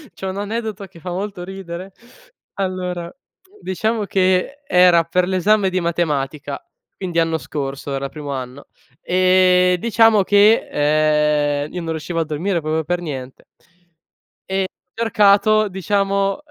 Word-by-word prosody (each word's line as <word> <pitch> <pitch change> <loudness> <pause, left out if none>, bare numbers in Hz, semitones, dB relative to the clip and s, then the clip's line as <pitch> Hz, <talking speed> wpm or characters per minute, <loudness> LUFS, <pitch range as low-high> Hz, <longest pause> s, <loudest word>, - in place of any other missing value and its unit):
c'ho 190 - -5
un 190 - -5
aneddoto 210 -1 -4
che 170 -2 -16
fa 180 +2 -6
molto 195 0 -4
ridere. 190 0 -8 0.6
Allora, 180 -3 -3 0.5
diciamo 215 +3 -1
che, 185 +5 +1
uhm, 180 - 0
era 180 -2 +6
per 180 +2 0
l'esame 190 +2 +2
di 185 0 -1
matematica, 150 -5 -2 0.4
quindi 175 -3 -2
anno 165 -1 +1
scorso 140 -2 -5
era 135 0 -3
primo 145 -1 -7
anno, 130 +1 -6 0.3
e 185 0 +3
diciamo 225 -1 +4
che, 150 -7 +3
uhm, - - -17
io 180 - -4
non 165 -1 -4
riuscivo 160 +2 -3
a 165 - 0
dormire 165 +3 -2
proprio 155 +1 -1
per 175 +3 -1
niente 135 -6 -7 1.0
e 190 0 0 0.3
cercato, 215 -1 +3
diciamo, 195 +1 0
uhm, - - -6
180 Hz, 140 wpm, -20 LUFS, 155-195 Hz, 1.0 s, era